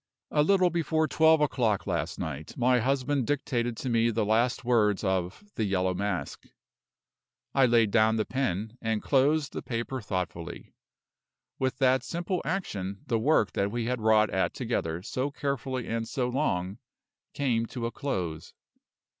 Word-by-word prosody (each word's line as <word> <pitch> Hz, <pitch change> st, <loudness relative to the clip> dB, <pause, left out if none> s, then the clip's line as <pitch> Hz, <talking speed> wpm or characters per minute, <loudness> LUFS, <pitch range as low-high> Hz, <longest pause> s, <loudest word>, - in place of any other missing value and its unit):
A 150 Hz, -, +3 dB
little 185 Hz, +2 st, +4 dB
before 160 Hz, -1 st, +1 dB
twelve 160 Hz, 0 st, +4 dB
o'clock 120 Hz, -8 st, +1 dB
last 85 Hz, -3 st, -2 dB
night, 80 Hz, -3 st, -6 dB
my 125 Hz, 0 st, +3 dB
husband 135 Hz, +1 st, 0 dB
dictated 120 Hz, -5 st, -1 dB
to -, -, -5 dB
me 115 Hz, 0 st, +3 dB
the 110 Hz, -1 st, 0 dB
last 115 Hz, +4 st, +1 dB
words 110 Hz, -5 st, +2 dB
of 95 Hz, -, -1 dB
"The 110 Hz, -, -2 dB
Yellow 95 Hz, -2 st, +1 dB
Mask." 95 Hz, -6 st, -3 dB, 1.1 s
I 135 Hz, -2 st, +5 dB
laid 115 Hz, -3 st, +3 dB
down 110 Hz, 0 st, +4 dB
the 110 Hz, -1 st, 0 dB
pen, 110 Hz, -3 st, -2 dB
and 110 Hz, -2 st, -1 dB
closed 145 Hz, +2 st, +2 dB
the -, -, -4 dB
paper 120 Hz, +2 st, -4 dB
thoughtfully. 90 Hz, -5 st, -5 dB, 0.9 s
With 130 Hz, -1 st, 0 dB
that 130 Hz, -1 st, +3 dB
simple 175 Hz, +2 st, -2 dB
action 100 Hz, -, -3 dB
the 115 Hz, -, 0 dB
work 125 Hz, -4 st, +3 dB
that 100 Hz, -, 0 dB
we 115 Hz, +1 st, -2 dB
had 125 Hz, -1 st, -2 dB
wrought 110 Hz, -1 st, +4 dB
at 95 Hz, -, 0 dB
together 80 Hz, +2 st, -2 dB
so 130 Hz, +6 st, -2 dB
carefully 135 Hz, -3 st, -3 dB
and 115 Hz, 0 st, -2 dB
so 125 Hz, -1 st, -1 dB
long 100 Hz, -8 st, -1 dB, 0.6 s
came 120 Hz, -5 st, 0 dB
to 120 Hz, -1 st, -5 dB
a 115 Hz, -, -2 dB
close. 90 Hz, -, -4 dB
115 Hz, 155 wpm, -28 LUFS, 100-135 Hz, 1.1 s, I